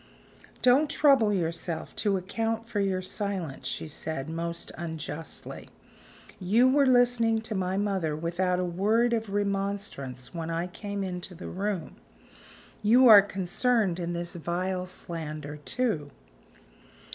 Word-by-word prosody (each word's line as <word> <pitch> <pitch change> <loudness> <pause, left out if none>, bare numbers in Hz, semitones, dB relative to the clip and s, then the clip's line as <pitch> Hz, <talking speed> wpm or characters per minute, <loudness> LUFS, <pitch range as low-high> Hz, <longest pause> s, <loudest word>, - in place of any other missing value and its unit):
"Don't 270 +4 +5
trouble 275 -7 +4
yourself 170 -3 -2
to 200 -3 +2
account 225 +4 -2
for 220 -3 -2
your 190 -2 0
silence," 185 -7 -3
she - - -3
said, 155 -1 -5
most 170 +1 -3
unjustly. 160 -1 -6 0.7
"You 215 +7 +4
were 275 +1 +4
listening 245 -3 +4
to 220 0 -4
my 190 -1 -1
mother 190 -7 0
without 175 +3 0
a 180 - 0
word 215 +7 +2
of 225 -2 -1
remonstrance 195 - -2
when 165 -1 -4
I 165 +1 -1
came 200 +2 -5
into 180 -1 -5
the 180 - -8
room. 195 -2 -3 0.8
You 245 +5 +6
are 210 -2 +11
concerned 195 0 0
in 175 0 -3
this 170 0 -4
vile 180 +2 -2
slander, 155 -4 -6
too." 150 - -2
190 Hz, 130 wpm, -28 LUFS, 170-220 Hz, 0.8 s, are